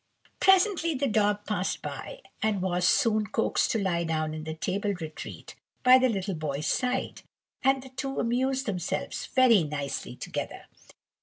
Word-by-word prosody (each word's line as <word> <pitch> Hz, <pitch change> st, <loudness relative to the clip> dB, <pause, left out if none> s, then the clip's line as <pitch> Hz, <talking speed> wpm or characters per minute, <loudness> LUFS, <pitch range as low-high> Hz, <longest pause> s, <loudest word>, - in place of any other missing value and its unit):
Presently 375 Hz, -4 st, +4 dB
the 275 Hz, +2 st, 0 dB
dog 210 Hz, -3 st, +1 dB
passed 200 Hz, -3 st, -2 dB
by, -, -, -7 dB, 0.2 s
and 215 Hz, -2 st, +1 dB
was 180 Hz, -1 st, +1 dB
soon 215 Hz, -5 st, +3 dB
coaxed 225 Hz, +1 st, +1 dB
to 225 Hz, -, +1 dB
lie 175 Hz, -4 st, 0 dB
down 155 Hz, -1 st, -1 dB
in 155 Hz, 0 st, -6 dB
the 160 Hz, 0 st, -4 dB
table 200 Hz, +4 st, -1 dB
retreat 160 Hz, -2 st, -8 dB, 0.3 s
by 255 Hz, +1 st, +8 dB
the 255 Hz, 0 st, +3 dB
little 195 Hz, -3 st, -2 dB
boy's 150 Hz, -2 st, -3 dB
side, 255 Hz, +5 st, -1 dB, 0.4 s
and 270 Hz, 0 st, +2 dB
the 265 Hz, -, -11 dB
two 270 Hz, +1 st, -4 dB
amused 260 Hz, +3 st, 0 dB
themselves 180 Hz, -5 st, -3 dB
very 245 Hz, -, +5 dB
nicely 145 Hz, -2 st, -4 dB
together. -, -, -5 dB
210 Hz, 155 wpm, -28 LUFS, 175-260 Hz, 0.4 s, by